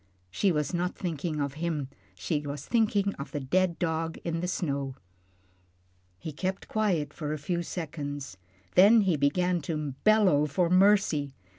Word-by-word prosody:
She 195 - +2
was 150 +1 -1
not 180 +1 -1
thinking 160 -3 -3
of 140 -1 -1
him, 155 -5 -1 0.3
she 100 - -1
was 145 0 -6
thinking 205 -4 +1
of 140 - -5
the 145 - -3
dead 175 +6 +1
dog 160 -1 -2
out 170 - -2
on 165 - -1
the 180 - -2
snow. 140 -7 -2 1.2
He 155 - -6
kept 185 +6 -4
quiet 180 -10 0
for 150 -2 -4
a - - -3
few 170 +3 -2
seconds, 145 - -5 0.4
then 210 +5 +7
he 190 -5 +2
began 175 +5 +1
to 150 -2 -3
bellow 195 -9 +4
for 170 +4 0
mercy. 185 -8 +3
165 Hz, 160 wpm, -28 LUFS, 145-185 Hz, 1.2 s, then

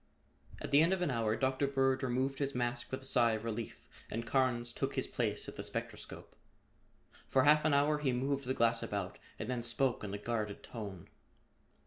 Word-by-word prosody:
At - - -5
the 140 +2 +7
end 170 +4 +4
of 185 -1 0
an 150 - +1
hour 115 -3 +1
Dr. 135 +2 +1
Bird 135 -1 +2
removed 130 +2 0
his 140 -2 -1
mask 120 +1 -1
with 130 0 -4
a - - -12
sigh 115 -3 +4
of 110 0 -3
relief 115 0 -5 0.2
and 115 +1 -3
Carnes 120 -2 +1
took - - -2
his - - 0
place - - -1
at - - -8
the - - -3
spectroscope. - - -6 0.9
For 130 - +4
half 150 +2 +5
an 155 - +4
hour 150 +1 +3
he 140 -3 +1
moved 135 +2 -1
the 130 +1 -1
glass 115 0 +3
about 100 -3 -3 0.2
and 110 - -4
then 125 -1 -1
spoke 120 +1 +1
in 105 - -4
a 100 - -3
guarded 105 -1 -3
tone. 100 -7 -7
125 Hz, 200 wpm, -34 LUFS, 115-135 Hz, 0.9 s, the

